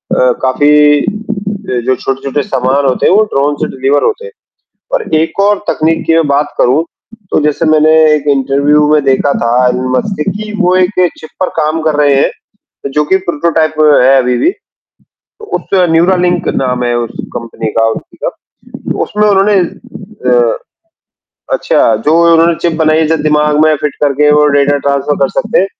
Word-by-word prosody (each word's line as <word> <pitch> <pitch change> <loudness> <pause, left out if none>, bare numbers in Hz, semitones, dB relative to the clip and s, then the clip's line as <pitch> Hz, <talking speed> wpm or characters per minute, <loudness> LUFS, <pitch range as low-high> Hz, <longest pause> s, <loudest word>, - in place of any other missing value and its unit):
अ, 125 -1 +3
काफ़ी 145 +2 +3 0.6
जो 125 -1 -2
जो 130 +2 0
छोटे-छोटे 135 +2 -3
सामान 130 +2 -1
होते 130 - 0
हैं, - - +4
वो 215 +2 +4
ड्रोन 145 +1 0
से - - 0
डिलीवर 135 +2 0
होते 470 +2 -2
हैं 475 - -10 0.6
और - - 0
एक 160 +5 -1
और 205 0 +2
तकनीक 160 +1 -1
की 165 - +3
मैं 165 -2 +2
बात 145 +1 0
करूँ, 135 +6 +2 0.5
तो - - +2
जैसे 150 +2 0
मैंने 155 0 +3 0.2
एक 150 -1 -2
इंटरव्यू 140 +2 +1
में 150 -2 +2
देखा 135 +1 +1
था 115 - 0 0.2
एलन 125 +1 -1
मस्क 200 +8 -2
का 195 - -1
कि 210 +2 -7
वो 180 +1 +2
एक 185 0 +2 0.3
चिप 155 - -11
पर 185 - +1
काम 155 +1 -1
कर 155 -2 0
रहे 140 -1 +3
हैं 140 0 -5
जो 150 - +1
कि 190 +5 +2
प्रोटोटाइप 160 -1 0 0.3
है 135 +1 +4
अभी 125 -1 +1
भी, 350 - +1 1.1
उसका 185 -2 0
न्यूरालिंक 180 +1 +1
नाम 125 -1 -1
है 120 0 -1
उस 120 -1 -4 0.2
कंपनी 115 -1 -5
का 115 - +3
उसी - - -8
का। - - 0 0.8
उसमें 210 0 0
उन्होंने 200 +1 +2 0.8
अ - - +2 1.0
अच्छा - - +1
जो 155 - +3 0.2
उन्होंने 165 +1 +3
चिप 170 - 0
बनाई 155 0 +2
है 160 - +1
जो 160 - +1
दिमाग 150 -1 +1
में 155 0 +3
फिट 145 0 -3
करके 150 +1 +2
वो 150 0 +3
डाटा 145 0 +2
ट्रांसफर 140 +1 -1
कर 135 - +2
सकते 220 - 0
हैं। 195 - +1
150 Hz, 180 wpm, -11 LUFS, 135-170 Hz, 1.1 s, हैं